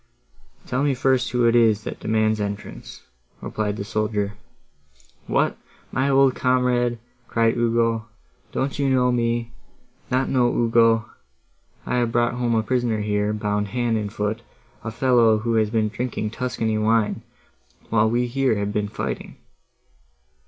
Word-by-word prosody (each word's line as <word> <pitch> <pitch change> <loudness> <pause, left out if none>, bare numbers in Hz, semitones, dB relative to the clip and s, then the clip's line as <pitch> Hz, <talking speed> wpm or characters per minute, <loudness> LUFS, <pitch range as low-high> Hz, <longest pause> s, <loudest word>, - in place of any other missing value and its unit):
"Tell 130 +1 -1
me 145 -2 +2
first 130 -1 +1
who 125 -1 +1
it 115 0 +4
is, 110 -3 +4
that - - -6
demands 110 -1 +1
entrance," 100 0 -6 0.4
replied 105 -1 -3
the 100 - -3
soldier. 105 -1 -1 0.9
"What! - - +1 0.3
my 130 +2 +1
old 135 -1 +4
comrade," 125 -2 +1 0.3
cried 115 -1 +2
Ugo, 115 -1 +1 0.4
"don't 135 +2 -2
you 140 -1 +2
know 125 -1 +3
me? 120 -1 0 0.6
not 130 +1 +1
know 125 -2 +2
Ugo? 115 -1 +3 0.8
I 125 - -1
have 120 -2 +1
brought 120 0 +1
home 120 -1 0
a 110 - +2
prisoner 120 -2 0
here, 105 0 0
bound 105 -1 -1
hand 120 +2 -1
and 105 -2 -2
foot—a 110 +1 -6
fellow, 115 -2 +3
who 115 +2 -1
has 110 -2 +2
been 110 -1 +1
drinking 110 -1 -3
Tuscany 115 -3 -2
wine, 110 0 +1 0.7
while 110 -1 +3
we 120 +2 +1
here 130 -1 +1
have 100 0 -2
been 105 -1 0
fighting." 105 - -5
115 Hz, 145 wpm, -23 LUFS, 110-125 Hz, 0.9 s, it